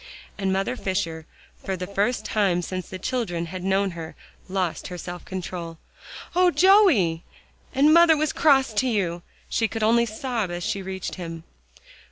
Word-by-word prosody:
And 195 -2 -1
Mother 195 +6 0
Fisher, 185 -7 -3 0.4
for 190 -1 -3
the 180 - -4
first 205 +4 -1
time 195 -5 +1
since 185 +1 -5
the 185 - -6
children 185 -6 -2
had 180 +2 -7
known 195 +1 +1
her, 165 -2 -8 0.3
lost 185 -3 -2
her 180 - -7
self 175 0 -7
control. 175 -3 -6 0.6
"Oh, 360 0 +5
Joey! 340 - +4 0.5
and 290 +3 +5
mother 335 -1 +7
was 305 -1 0
cross 270 -6 +3
to 235 +5 +1
you," 180 -7 -1 0.3
she 225 - +1
could 225 0 -4
only 235 +2 +4
sob 225 -2 -3
as 175 0 -4
she 210 -2 -2
reached 190 0 -5
him. 165 -1 -6
195 Hz, 165 wpm, -24 LUFS, 175-235 Hz, 0.6 s, mother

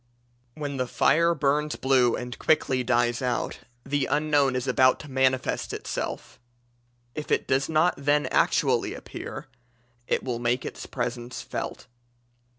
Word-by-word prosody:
When 145 -2 -4
the 125 -1 -1
fire 170 +7 +3
burns 150 +1 +1
blue 130 -3 +3
and 125 0 -6
quickly 130 -5 +2
dies 120 0 +1
out, 125 -2 -2 0.3
the 140 0 0
Unknown 145 -3 +2
is 125 +1 -2
about 130 0 +4
to 150 - -11
manifest 130 0 +1
itself; - - -5 0.7
if 150 - -6
it - - +2
does 135 +2 +1
not 160 +3 +3
then 145 +1 +2
actually - - +2
appear - - -8 0.6
it - - 0
will 125 -3 -3
make 120 +1 0
its - - -7
presence 120 0 -4
felt. - - -5
130 Hz, 140 wpm, -26 LUFS, 125-145 Hz, 0.7 s, about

